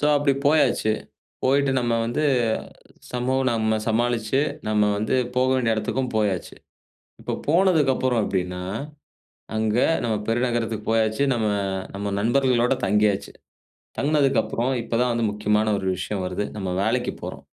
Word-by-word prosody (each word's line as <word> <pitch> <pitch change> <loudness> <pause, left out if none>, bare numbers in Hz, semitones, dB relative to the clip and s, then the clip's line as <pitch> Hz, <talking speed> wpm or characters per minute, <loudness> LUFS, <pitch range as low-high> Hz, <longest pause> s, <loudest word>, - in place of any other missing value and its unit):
So 145 - +2
அப்படி 145 -1 +2
போயாச்சு. 145 -7 +3 0.5
போயிட்டு 140 +1 +3
நம்ம 120 -1 0
வந்து, 120 +6 -1 0.9
சமூகம் 130 +2 0
நம்ம 110 -1 +1
சமாளிச்சு, 120 +2 +1 0.3
நம்ம 105 -1 +2
வந்து 110 +5 0 0.2
போக 130 +1 +3
வேண்டிய 120 -3 +1
இடத்துக்கும் 125 +4 -2
போயாச்சு. 105 -5 -1 0.7
இப்போ - - -3
போனதுக்கப்புறம் 145 -8 +3
எப்படின்னா? 90 -1 -2 1.0
அங்க 110 0 0 0.3
நம்ம 115 -2 0
பெருநகரத்துக்கு 115 -2 -1
போயாச்சு. 110 +2 +1
நம்ம 110 -3 0 0.5
நம்ம, 100 0 -3
நண்பர்களோடு 125 +2 +2
தங்கியாச்சு. 105 0 +1 0.7
தங்குனதுக்கப்புறம், 135 -3 +1
இப்ப 115 - -2
தான் 125 -1 +2
வந்து 115 -1 0
முக்கியமான 105 +1 +1
ஒரு 95 -1 -3
விஷயம் 95 +1 -3
வருது. 90 +3 -2
நம்ம 95 -3 -3
வேலைக்குப் 120 +4 -1
போறோம்! - - -7
115 Hz, 125 wpm, -23 LUFS, 105-130 Hz, 1.0 s, போயாச்சு